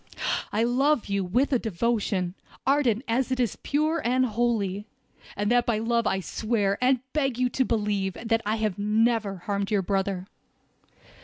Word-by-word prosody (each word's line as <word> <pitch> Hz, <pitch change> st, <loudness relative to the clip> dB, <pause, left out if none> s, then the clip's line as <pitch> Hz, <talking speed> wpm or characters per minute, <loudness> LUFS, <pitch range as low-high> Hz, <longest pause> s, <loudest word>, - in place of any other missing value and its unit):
I 215 Hz, +2 st, +1 dB
love 265 Hz, +3 st, +2 dB
you, 200 Hz, -1 st, 0 dB
with 245 Hz, +11 st, +1 dB
a 255 Hz, -, +3 dB
devotion, 205 Hz, -3 st, -1 dB, 0.3 s
ardent 265 Hz, -5 st, +2 dB
as 250 Hz, +3 st, 0 dB
it 260 Hz, -, 0 dB
is 240 Hz, -4 st, +1 dB
pure 310 Hz, +3 st, 0 dB
and 255 Hz, +2 st, +2 dB
holy; 215 Hz, -4 st, -1 dB, 0.5 s
and 205 Hz, +1 st, 0 dB
by 240 Hz, -2 st, +3 dB
that 220 Hz, -, -3 dB
love 235 Hz, 0 st, +1 dB
I 190 Hz, -, +1 dB
swear, 205 Hz, -1 st, -1 dB
and 255 Hz, -1 st, +3 dB
beg 270 Hz, -5 st, 0 dB
you 250 Hz, 0 st, +2 dB
to 260 Hz, -, +1 dB
believe, 205 Hz, -5 st, 0 dB
that 225 Hz, +2 st, -1 dB
I 215 Hz, +1 st, 0 dB
have 215 Hz, -3 st, -2 dB
never 215 Hz, 0 st, +1 dB
harmed 200 Hz, -1 st, -1 dB
your 205 Hz, -3 st, +1 dB
brother!" 195 Hz, -1 st, -1 dB
225 Hz, 165 wpm, -26 LUFS, 200-245 Hz, 0.5 s, a